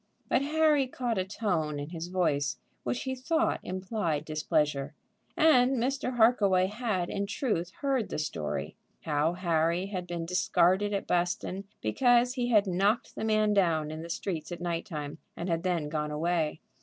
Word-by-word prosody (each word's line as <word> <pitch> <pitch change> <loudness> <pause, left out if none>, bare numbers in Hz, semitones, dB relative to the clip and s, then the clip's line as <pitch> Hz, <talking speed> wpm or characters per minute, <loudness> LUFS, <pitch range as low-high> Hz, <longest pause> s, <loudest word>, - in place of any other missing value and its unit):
But - - +3
Harry 300 -1 +3
caught 245 -4 -2
a - - +1
tone 175 -7 -1
in 145 +1 -5
his 165 -1 -5
voice 160 -6 0 0.2
which 120 0 -2
he 260 - -2
thought 320 +6 0
implied 185 -5 -2
displeasure. 150 -2 0 0.4
And 270 -6 +5
Mr. 255 +1 -1
Harkaway 205 -6 +4
had 210 -5 -2
in 200 0 -2
truth 205 -5 -1
heard 270 -6 0
the - - -3
story, 80 - -3 0.3
how 150 +2 +1
Harry 170 0 +1
had 185 -3 -5
been 170 -1 -3
discarded 185 +2 +2
at 200 -1 -1
Buston 180 +2 -1 0.2
because 245 - +3
he 245 -2 -1
had 210 -4 +5
knocked 200 +6 +1
the - - -5
man 215 -1 +2
down 165 -6 +2
in 155 0 -6
the 170 - -8
streets 170 -2 -4
at 175 - -5
night 170 0 -3
time 150 -3 -6 0.2
and 170 - -4
had 165 -1 0
then 175 -4 0
gone 150 0 -2
away. 160 0 -1
180 Hz, 170 wpm, -29 LUFS, 160-225 Hz, 0.4 s, And